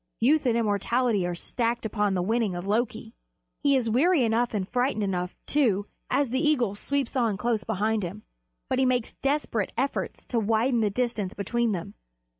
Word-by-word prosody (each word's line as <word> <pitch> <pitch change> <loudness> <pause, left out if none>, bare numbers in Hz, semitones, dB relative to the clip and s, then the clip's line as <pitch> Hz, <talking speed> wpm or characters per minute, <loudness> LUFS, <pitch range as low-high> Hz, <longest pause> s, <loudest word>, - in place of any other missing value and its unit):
Youth 285 +4 +3
and 235 -1 +3
immortality 215 -1 +1
are 175 - -3
staked 235 +6 -2
upon 210 -2 0
the 180 - 0
winning 220 -1 0
of 175 +1 -5
Loki. 220 +4 -1 0.5
He 280 -1 +4
is 250 -3 +1
weary 280 +6 +3
enough 230 0 +1
and 190 -3 -1
frightened 245 -1 0
enough, 180 -2 -2
too, 220 -9 +2 0.2
as 280 -4 +1
the 260 - +1
eagle 255 -9 +2
sweeps 275 +5 -2
on 230 -6 +1
close 230 0 0
behind 220 +1 0
him; 195 +4 -6 0.4
but - - 0
he 265 - +4
makes 250 -2 0
desperate 275 -7 -1
efforts 270 +3 -2
to 240 - 0
widen 225 +3 +2
the 215 -2 +2
distance 215 -3 -2
between 235 +3 0
them. 175 -3 -5
230 Hz, 180 wpm, -27 LUFS, 205-250 Hz, 0.5 s, He